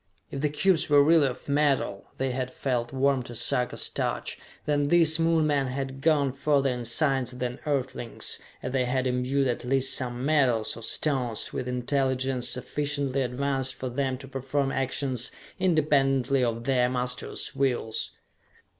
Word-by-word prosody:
If 135 - -4
the 150 - +2
cubes 165 +3 +2
were 145 -1 +7
really 155 -1 +5
of 125 - -7
metal 140 -8 +1
they 135 0 -1
had 130 0 -2
felt 125 -2 -2
warm 135 0 +2
to 120 -1 -8
Sarka's 120 +1 0
touch - - -3 0.3
then 145 -1 +1
these 160 0 +5
Moon 165 -1 +3
men 145 -3 +1
had 135 +1 -4
gone 145 -4 +3
further 140 -1 +2
in 125 -1 -4
science 135 +1 +1
than 125 -1 -4
Earthlings, 130 -4 -2 0.2
as 125 - -3
they 130 -1 +1
had 130 +1 0
imbued 130 +2 +1
at 120 -1 -2
least 135 +1 +1
some 125 0 -3
metals, 130 -7 +2
or 115 - -9
stones, 125 -2 -1
with 125 - -3
intelligence 130 0 0
sufficiently 140 +1 -1
advanced 130 +1 -1
for 130 - -4
them 130 +1 -1
to 135 +1 -11
perform 135 +1 -1
actions 130 -2 +1 0.3
independently 140 -6 +2
of 115 -1 -1
their 125 -1 +2
masters' 125 0 -3
wills. 125 -5 0
135 Hz, 155 wpm, -27 LUFS, 125-140 Hz, 0.3 s, were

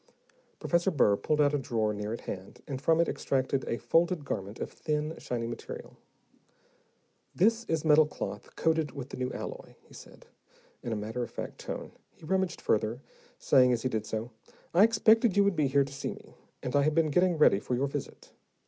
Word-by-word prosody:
Professor 170 +2 +1
Burr 130 - +3
pulled 150 +8 -1
out 145 -1 +4
a 145 - +1
drawer 110 -4 -1
near 105 +1 -4
at 115 - -4
hand, 95 0 -8
and 135 -3 -5
from 160 +2 +3
it 170 - +3
extracted 135 0 -1
a 115 - -1
folded 165 - +1
garment 100 -3 -4
of - - -4
thin, 150 0 -2
shiny 120 -2 -3
material. 115 0 -7 1.4
"This 225 +5 +3
is 160 -1 -1
metal 155 0 +6
cloth - - -7
coated 160 -2 +1
with 135 -2 -7
the - - -7
new 125 0 -2
alloy," - - -7
he - - -20
said, - - -14 0.6
in 120 - -5
a - - 0
matter 110 +4 -4
of 120 - -3
fact - - -7
tone. - - -6 0.2
He - - -14
rummaged 190 +1 0
further, 110 +5 0 0.3
saying 130 -3 +4
as 115 - -2
he 130 - +1
did 110 -3 -3
so, 110 +3 -4 0.4
"I 180 +4 +6
expected 225 -1 +4
you 200 - +6
would 200 -2 +2
be 150 -3 +2
here 140 +1 +3
to 135 0 -8
see 140 - -4
me, - - -16 0.3
and 125 - -3
I 145 - +5
have 150 +2 +1
been 160 -2 +2
getting 180 +2 +3
ready 150 -9 +5
for 125 - -2
your 130 +3 +1
visit. 140 0 -6
140 Hz, 200 wpm, -29 LUFS, 120-165 Hz, 1.4 s, metal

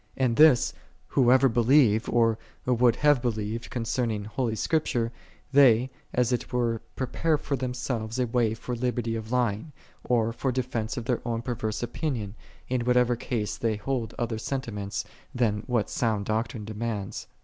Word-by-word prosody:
And 125 -3 +2
this, 150 -4 +6 0.4
whoso 130 +1 +5
believe 120 -2 +4
or 115 -2 +3 0.3
would 120 -1 +3
have 145 -2 +3
believed 115 -1 -3
con 120 -4 -3
cerning 115 -3 -1
holy 115 +1 -2
Scripture, 120 -4 0 0.4
they, 130 -3 +5 0.2
as 125 0 +1
it 120 - -2
were, 120 -2 0
pre 130 - -1
pare 160 +5 +1
for 145 - -2
themselves 125 -3 -3
a 125 - +2
way 115 -2 +1
for 120 +2 -5
liberty 120 -1 -1
oklying, 115 +4 -1 0.3
or 115 -2 +1
for 130 +2 -1
defense 120 -3 -2
of 120 - -4
their 125 -1 0
own 115 -1 -2
perverse 115 -3 -3
opinion, 120 -5 -3 0.3
in 125 -1 0
whatever 125 0 +3
case 110 -3 -3
they 110 0 0
hold 115 +2 -3
other 115 -2 -2
sentiments 105 -7 -3 0.3
than 110 -4 +1
what 120 -5 +1
sound 110 -4 -1
doctrine 110 0 -2
demands. 110 -2 -4
120 Hz, 155 wpm, -27 LUFS, 110-125 Hz, 0.4 s, this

